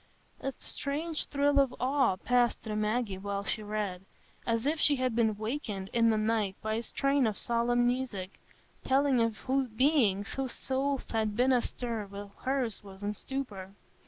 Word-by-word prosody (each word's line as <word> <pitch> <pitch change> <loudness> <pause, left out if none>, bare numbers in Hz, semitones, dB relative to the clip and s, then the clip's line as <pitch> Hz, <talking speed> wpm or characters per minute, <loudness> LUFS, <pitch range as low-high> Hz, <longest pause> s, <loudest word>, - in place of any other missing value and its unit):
A 270 - -2
strange 305 +3 -2
thrill 285 0 +3
of 270 -2 +2
awe 265 -5 +2
passed 245 +4 +2
through 215 -2 -3
Maggie 215 -2 0
while 200 0 -3
she 215 - -2
read, 205 -3 -3 0.5
as 230 +1 +1
if 305 +2 +1
she 290 - +5
had 255 -3 0
been 220 -3 +2
wakened 215 -4 -4
in 230 -1 +4
the 220 - +3
night 215 -3 +1
by 215 0 -2
a 225 - 0
strain 275 +1 +1
of 215 - -2
solemn 240 +1 +2
music, 240 -7 -2 0.4
telling 270 -2 +3
of 230 -1 -1 0.3
beings 225 -9 +3
whose 270 -2 -2
souls 270 +1 -1
had 220 -2 0
been 250 +3 +3
astir 235 -3 -1
while 200 0 -8
hers 255 -6 -1
was 195 0 -11
in 205 +1 -1
stupor. 205 -6 -5
230 Hz, 165 wpm, -30 LUFS, 210-265 Hz, 0.5 s, she